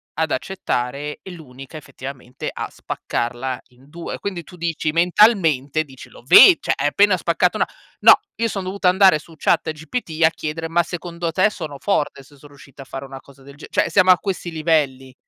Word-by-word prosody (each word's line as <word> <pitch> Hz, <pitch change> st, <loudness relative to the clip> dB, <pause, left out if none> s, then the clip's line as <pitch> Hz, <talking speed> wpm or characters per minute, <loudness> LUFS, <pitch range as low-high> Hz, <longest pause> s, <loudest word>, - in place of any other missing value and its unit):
ad 160 Hz, +1 st, -1 dB
accettare, 145 Hz, -4 st, -3 dB
e 190 Hz, -, -9 dB
l'unica 135 Hz, -5 st, -12 dB
effettivamente 135 Hz, -3 st, -9 dB
a -, -, -5 dB
spaccarla 120 Hz, +2 st, -4 dB
in 130 Hz, +3 st, -23 dB
2. 170 Hz, +2 st, -7 dB
Quindi 185 Hz, -4 st, -5 dB
tu 180 Hz, -, -15 dB
dici 165 Hz, -2 st, -2 dB
mentalmente, 165 Hz, -, +3 dB
dici 135 Hz, -4 st, -14 dB
lo -, -, -16 dB
ve -, -, +9 dB
cioè -, -, -1 dB
hai -, -, 0 dB
appena 195 Hz, +6 st, +3 dB
spaccato 170 Hz, +1 st, 0 dB
na -, -, +1 dB, 0.3 s
no, -, -, +9 dB, 0.2 s
io 230 Hz, -, 0 dB
son 200 Hz, -3 st, -4 dB
dovuta 185 Hz, 0 st, 0 dB
andare 190 Hz, -2 st, +5 dB
su 165 Hz, +2 st, -16 dB
Chat 155 Hz, -, +1 dB
GPT 160 Hz, +1 st, -4 dB
a 160 Hz, -, +7 dB
chiedere: 165 Hz, 0 st, -5 dB
"Ma 170 Hz, +1 st, +2 dB
secondo 170 Hz, 0 st, -5 dB
te 185 Hz, +6 st, +3 dB
sono 160 Hz, -8 st, -7 dB
forte 150 Hz, -7 st, -1 dB
se 145 Hz, +2 st, -20 dB
so 140 Hz, -, -19 dB
riuscita 140 Hz, -1 st, -14 dB
a -, -, -19 dB
fare 135 Hz, +3 st, -7 dB
una 135 Hz, 0 st, -10 dB
cosa 140 Hz, 0 st, -20 dB
del 140 Hz, +1 st, -14 dB
ge" 145 Hz, -, -12 dB
Cioè -, -, +1 dB
siamo 185 Hz, -2 st, +5 dB
a 180 Hz, -, +6 dB
questi 185 Hz, -3 st, -4 dB
livelli. 150 Hz, -5 st, -1 dB
160 Hz, 195 wpm, -20 LUFS, 140-180 Hz, 0.3 s, ve